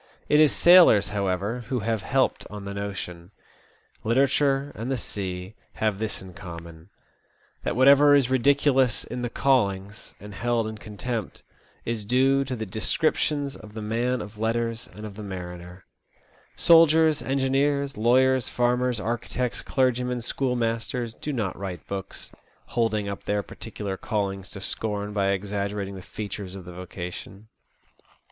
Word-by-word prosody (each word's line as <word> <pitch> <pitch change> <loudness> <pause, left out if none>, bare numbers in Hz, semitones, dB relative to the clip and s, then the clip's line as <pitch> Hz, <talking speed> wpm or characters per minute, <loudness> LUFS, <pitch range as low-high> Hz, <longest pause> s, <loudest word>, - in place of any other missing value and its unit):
It 150 - +4
is 155 -2 +6
sailors, 170 - +7
however, 100 +3 -1
who 125 -2 -1
have 110 0 -1
helped 130 +6 0
on 105 -1 -8
the 100 - -5
notion. 95 -4 -5 0.7
Literature 135 +3 +2
and 115 +3 -5
the 135 - 0
sea 95 -3 -4 0.2
have 110 -2 -1
this 110 -1 -2
THE - - -9
OLD 90 -2 -12
SEA - - -12
DOG. - - -10
109 85 -1 -6
in 80 -1 -12
common— 85 - -22 0.7
that - - -2
whatever 140 +3 +7
is 140 -4 +4
ridiculous 135 -1 +3
in 125 - -6
the 120 - -2
caUings, 100 -6 0
and 105 +1 -10
held 120 +2 0
in 110 -1 -6
contempt, 110 +1 -5 0.4
is 115 -2 -2
due 135 +5 +3
to 130 -1 -3
the 110 -2 -4
descriptions 140 - 0
of 105 0 -13
the 110 - -5
man 120 +3 0
of 105 +1 -12
letters 115 +1 -1
and 105 +4 -9
of 105 - -7
the 110 - -8
mariner. 90 -2 -8 0.7
Soldiers, 160 -2 +5
engineers, 140 +1 +1
lawyers, 130 +3 +3
farmers, 125 -1 +1
architects, 120 +2 -2
clergymen, 125 -1 0
schoolmasters 120 -1 -1
do 150 - -5
not 110 -9 -2
write 95 -4 -6
books, 100 -1 -6 0.4
holding 110 -3 0
up 100 -1 -6
their 105 0 0
particular 100 -3 -6
callings 100 -3 -3
to 100 - -8
scorn 105 0 -2
by 100 -2 +1
exaggerating 100 0 -2
the 95 - -8
features 100 -1 -6
of 95 -2 -9
the 90 - -9
vocation. 90 +3 -8
110 Hz, 155 wpm, -25 LUFS, 100-130 Hz, 0.7 s, sailors